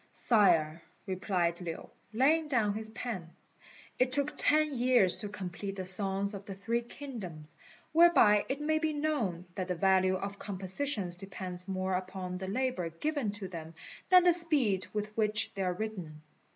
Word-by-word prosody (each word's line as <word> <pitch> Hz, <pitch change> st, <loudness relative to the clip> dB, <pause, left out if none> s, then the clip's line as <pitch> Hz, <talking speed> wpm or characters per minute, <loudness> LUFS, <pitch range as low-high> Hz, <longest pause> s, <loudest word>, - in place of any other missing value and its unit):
"Sire," 170 Hz, -8 st, +3 dB, 0.2 s
replied 185 Hz, -3 st, -2 dB
Lin, 165 Hz, -2 st, -6 dB, 0.3 s
laying 300 Hz, +8 st, +2 dB
down 230 Hz, -8 st, +1 dB
his 220 Hz, +1 st, -6 dB
pen, 215 Hz, -7 st, -6 dB, 0.7 s
"it 255 Hz, 0 st, +2 dB
took 285 Hz, +2 st, +2 dB
ten 305 Hz, 0 st, +2 dB
years 245 Hz, -7 st, +4 dB
to 210 Hz, -, -3 dB
complete 195 Hz, 0 st, -6 dB
the 190 Hz, -1 st, -5 dB
Songs 195 Hz, +2 st, +3 dB
of 200 Hz, -1 st, -7 dB
the 195 Hz, -, -6 dB
Three 230 Hz, +5 st, -2 dB
Kingdoms; 215 Hz, -, -5 dB, 0.4 s
whereby 300 Hz, -11 st, +5 dB
it 270 Hz, +2 st, -2 dB
may 310 Hz, +1 st, 0 dB
be 315 Hz, -1 st, -1 dB
known 250 Hz, -, -2 dB
that 185 Hz, 0 st, -4 dB
the 180 Hz, -, -2 dB
value 185 Hz, +1 st, +2 dB
of 200 Hz, +1 st, -6 dB
compositions 190 Hz, 0 st, -1 dB
depends 180 Hz, -1 st, -5 dB
more 190 Hz, 0 st, -2 dB
upon 185 Hz, 0 st, -4 dB
the 190 Hz, -, -6 dB
labour 215 Hz, -5 st, -2 dB
given 280 Hz, -, -3 dB
to 205 Hz, -2 st, -6 dB
them 165 Hz, -2 st, -9 dB, 0.3 s
than 365 Hz, -1 st, +7 dB
the 355 Hz, -1 st, +5 dB
speed 285 Hz, -, +4 dB
with 210 Hz, 0 st, -5 dB
which 215 Hz, -1 st, +1 dB
they 195 Hz, -, -5 dB
are 180 Hz, -1 st, 0 dB
written." 180 Hz, -7 st, -7 dB
200 Hz, 165 wpm, -30 LUFS, 185-255 Hz, 0.7 s, than